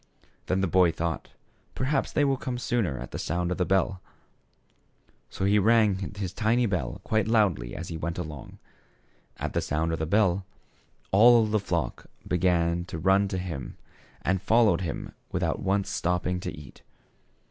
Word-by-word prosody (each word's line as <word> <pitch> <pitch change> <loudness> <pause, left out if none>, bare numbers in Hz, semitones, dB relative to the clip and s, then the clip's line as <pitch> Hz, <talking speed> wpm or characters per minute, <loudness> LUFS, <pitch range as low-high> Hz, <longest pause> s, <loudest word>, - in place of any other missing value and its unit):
Then 95 +1 +1
the 95 - +1
boy 90 0 +4
thought, 80 0 -3 0.5
"Perhaps 135 +1 0
they 145 - +2
will 135 -1 +2
come 125 -1 -4
sooner 115 - -1
at - - -7
the - - -5
sound 90 +2 -1
of 90 - -2
the 90 - +1
bell." 95 0 +1 1.3
So 95 - -3
he 105 +1 +4
rang 105 -3 +2
his 95 -3 -4
tiny 115 +3 +2
bell 80 - -2
quite 110 -2 0
loudly 95 - +1
as 85 - -6
he 85 - -4
went 85 +1 -4
along. 75 -6 -7 0.8
At - - -4
the - - +1
sound 80 +2 -1
of 80 - -2
the 80 - -2
bell, 95 0 +2 0.7
all 115 +3 +7
the 110 0 +1
flock 85 -5 -3 0.2
began 85 -1 +1
to 80 - -6
run 95 +4 +3
to 95 -1 -3
him, 85 -7 -5 0.5
and 95 0 +1
followed 110 -5 +3
him 85 - -4 0.2
without - - -1
once 100 +1 0
stop 90 0 0
THE - - -1
SHEPHERD - - 0
BOY. - - -9
61 - - -3
ping 75 - -10
to - - -13
eat. - - -17
95 Hz, 185 wpm, -27 LUFS, 85-105 Hz, 1.3 s, all